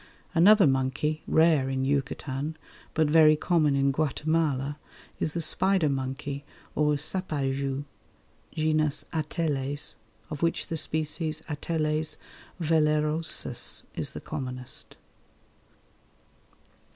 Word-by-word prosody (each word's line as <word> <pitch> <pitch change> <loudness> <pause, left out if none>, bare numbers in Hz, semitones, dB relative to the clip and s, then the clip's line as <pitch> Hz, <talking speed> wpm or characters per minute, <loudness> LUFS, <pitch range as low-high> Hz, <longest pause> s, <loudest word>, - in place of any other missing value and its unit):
Another 195 +4 +7
monkey, 135 +3 +1
rare 160 -4 +4
in 130 0 -1
Yucatan, 140 +2 -2 0.4
but 160 - +4
very 155 0 +6
common 155 -3 +2
in 140 0 +3
Guatemala, 150 -1 0 0.4
is 155 - -1
the 170 - 0
spider 185 -1 +2
monkey 135 +1 -3 0.3
or 150 0 +2
sapajou 140 -4 -2 0.7
(genus 155 -1 +1
Ateles), 145 -3 -1 0.4
of 150 - -5
which 165 0 +1
the 165 - -3
species 155 0 -1
A. 155 - -2
vellerosus 155 0 -1
is - - -3
the - - -6
commonest. 125 -1 -5
150 Hz, 95 wpm, -28 LUFS, 140-160 Hz, 0.7 s, Another